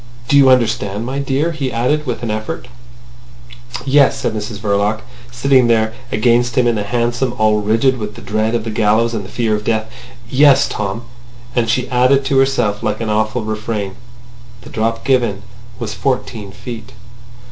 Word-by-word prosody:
Do 145 - +2
you 140 -2 +7
understand, 115 -4 +1
my 135 +3 -3
dear?" 140 +4 0
he 140 -5 -3
added, 130 +6 0
with 120 -1 -3
an 115 - -1
effort. 110 +3 -4 1.2
"Yes," 140 0 +4
said - - -1
Mrs 105 0 -5
Verloc, 105 +1 0 0.3
sitting 125 0 +3
there 110 -1 +2 0.2
against 120 +2 +2
him 125 - +4
in 120 - +3
the 105 - -1
hansom 120 +3 -1
all 110 -1 +2
rigid 115 +5 +2
with 105 -1 -5
the - - -10
dread 110 +2 0
of 115 - -1
the 115 - -4
gallows 110 +2 +2
and 110 -3 -3
the 95 - -10
fear 115 -1 0
of 105 - -4
death. 110 0 -1 0.4
"Yes, 140 +1 +5
Tom." 105 +2 -4 0.5
And 115 -2 +1
she 125 +2 +1
added 130 +2 +3
to 135 0 +2
herself, 120 -6 +1
like - - -1
an 110 -2 -2
awful 110 +2 0
refrain: 110 -2 -3 0.7
"The - - -13
drop 115 +1 -2
given 120 -7 +1 0.3
was 110 -2 -4
fourteen 110 -2 -2
feet." 115 +3 -9
115 Hz, 175 wpm, -17 LUFS, 110-130 Hz, 1.2 s, you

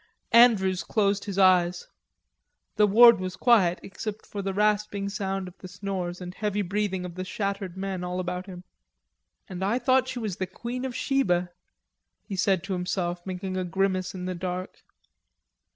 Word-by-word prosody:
Andrews 200 -6 +5
closed 200 +1 0
his 200 -2 -5
eyes. 180 -2 +3 0.9
The 210 -1 +4
ward 230 +1 +8
was 185 0 -4
quiet 195 -8 +4
except 210 +2 -6
for 205 - -5
the 195 0 -2
rasping 205 0 0
sound 195 -1 -3
of 180 - -11
the 185 - -9
snores 180 -2 -4
and 180 -1 -7
heavy 210 0 -1
breathing 190 -1 -2
of 175 - -7
the 185 +2 -5
shattered 195 -1 -4
men 190 -1 -3
all 180 +1 -3
about 180 +1 -4
him. 180 -2 -9 0.8
"And 185 0 -5
I 205 +5 +1
thought 255 +1 +2
she 255 - -5
was 215 -6 -3
the 185 - -2
Queen 240 +7 -5
of 255 -2 -5
Sheba," 180 -11 +1 0.7
he 200 - -6
said 190 -2 +1
to 195 0 -3
himself, 180 -1 -2
making 185 0 -4
a 185 - -1
grimace 185 +1 -1
in 180 -1 -5
the 185 - -2
dark. 180 +1 -5
190 Hz, 170 wpm, -26 LUFS, 180-210 Hz, 0.9 s, ward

